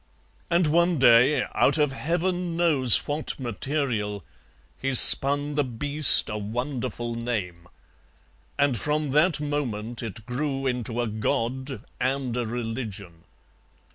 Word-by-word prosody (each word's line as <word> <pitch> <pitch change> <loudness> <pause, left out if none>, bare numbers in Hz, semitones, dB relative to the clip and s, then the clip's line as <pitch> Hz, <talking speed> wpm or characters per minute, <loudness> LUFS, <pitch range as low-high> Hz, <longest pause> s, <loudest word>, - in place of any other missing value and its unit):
And 170 0 +1
one 170 +2 +1
day, 125 +2 +4
out - - +2
of 150 -2 +1
Heaven 175 +4 -3
knows 145 -9 +5
what 150 +1 -4
material, 120 -4 -4 0.6
he 135 0 -2
spun 145 +4 +7
the 145 0 0
beast 140 +4 +2
a 105 -1 -5
wonderful 120 +2 -5
name, 105 -8 -5 0.9
and 140 -6 0
from 150 +1 -2
that 155 +3 +2
moment 120 -7 -5
it 110 -1 -8
grew 135 +2 -4
into 120 -2 -3
a 120 - -3
god 120 +5 -4 0.2
and 130 -2 -2
a 120 -2 -3
religion. 110 -7 -7
130 Hz, 120 wpm, -24 LUFS, 115-150 Hz, 0.9 s, spun